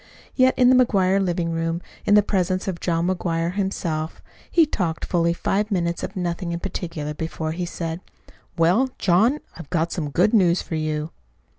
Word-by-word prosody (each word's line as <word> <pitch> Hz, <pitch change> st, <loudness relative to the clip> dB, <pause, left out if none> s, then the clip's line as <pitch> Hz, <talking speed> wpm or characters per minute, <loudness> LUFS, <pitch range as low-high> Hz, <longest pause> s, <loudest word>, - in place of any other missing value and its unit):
Yet 260 Hz, -1 st, +4 dB
in 250 Hz, 0 st, +6 dB
the -, -, +6 dB
McGuire 195 Hz, -3 st, +2 dB
living 175 Hz, -2 st, -1 dB
room, 165 Hz, 0 st, -1 dB, 0.3 s
in 205 Hz, -, +6 dB
the 210 Hz, -, +6 dB
presence 185 Hz, -2 st, 0 dB
of 180 Hz, -3 st, -3 dB
John 170 Hz, -1 st, 0 dB
McGuire 170 Hz, -2 st, -1 dB
himself, 170 Hz, -5 st, -2 dB, 0.3 s
he 335 Hz, -2 st, +5 dB
talked 175 Hz, -, -2 dB
fully 170 Hz, -1 st, +1 dB
five 200 Hz, +4 st, -1 dB
minutes 170 Hz, -4 st, -1 dB
of 195 Hz, -, -5 dB
nothing 175 Hz, -1 st, -2 dB
in 170 Hz, -, -3 dB
particular, 165 Hz, -5 st, -4 dB
before 160 Hz, 0 st, -4 dB
he 175 Hz, +2 st, -3 dB
said: 165 Hz, 0 st, -4 dB, 0.6 s
"Well, 180 Hz, +11 st, +3 dB
John, 215 Hz, +11 st, +3 dB, 0.2 s
I've 165 Hz, -5 st, -10 dB
got 170 Hz, -1 st, 0 dB
some 155 Hz, -5 st, -3 dB
good 180 Hz, +9 st, +2 dB
news 185 Hz, -5 st, +4 dB
for -, -, -7 dB
you." 155 Hz, 0 st, -2 dB
175 Hz, 175 wpm, -23 LUFS, 165-195 Hz, 0.6 s, in